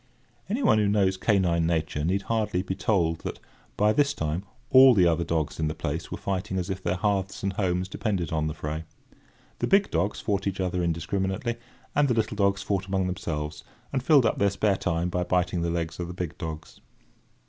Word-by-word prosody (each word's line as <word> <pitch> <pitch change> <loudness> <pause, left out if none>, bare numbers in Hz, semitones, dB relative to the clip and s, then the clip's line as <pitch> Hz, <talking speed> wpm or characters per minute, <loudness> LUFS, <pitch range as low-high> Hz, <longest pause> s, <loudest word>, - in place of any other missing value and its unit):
Anyone 225 - +3
who 105 - +2
knows 100 -2 +2
canine 90 -5 +2
nature 80 -2 -1
need 95 +5 0
hardly, 105 -5 0
be 95 - -3
told 90 -5 +1
that, - - -6 0.4
by 105 +1 +4
this 145 +2 +2
time, 80 +4 -2 0.3
all 130 -1 +8
the 90 -3 +5
other 85 0 +2
dogs 80 -3 -2
in 80 - +1
the 80 - -3
place 80 +2 -4
were 95 - -3
fighting 95 -1 -3
as 90 +1 -2
if 95 0 -4
their 90 0 0
hearths 100 0 -1
and 100 0 0
homes 90 -2 0
depended 95 -5 -2
on 80 -1 0
the 75 - -4
fray. 75 +1 -4 0.8
The - - 0
big 200 +1 +3
dogs 90 +5 0
fought 100 -1 -1
each 95 0 -2
other 90 -1 0
indiscriminately; 95 +7 -1 0.4
and 145 0 +3
the 125 - +1
little 110 -2 0
dogs 100 -1 +1
fought 95 -1 -1
among 95 -1 0
themselves, 85 -5 -4 0.3
and 130 - +1
filled 140 -2 +5
up 110 - +1
their 100 - +4
spare 100 0 +1
time 85 0 -1
by 90 0 -1
biting 90 -1 0
the 85 - 0
legs 85 0 -3
of 85 - -3
the 90 - -7
big 90 -3 -4
dogs. 80 -1 -7
95 Hz, 205 wpm, -26 LUFS, 85-100 Hz, 0.8 s, all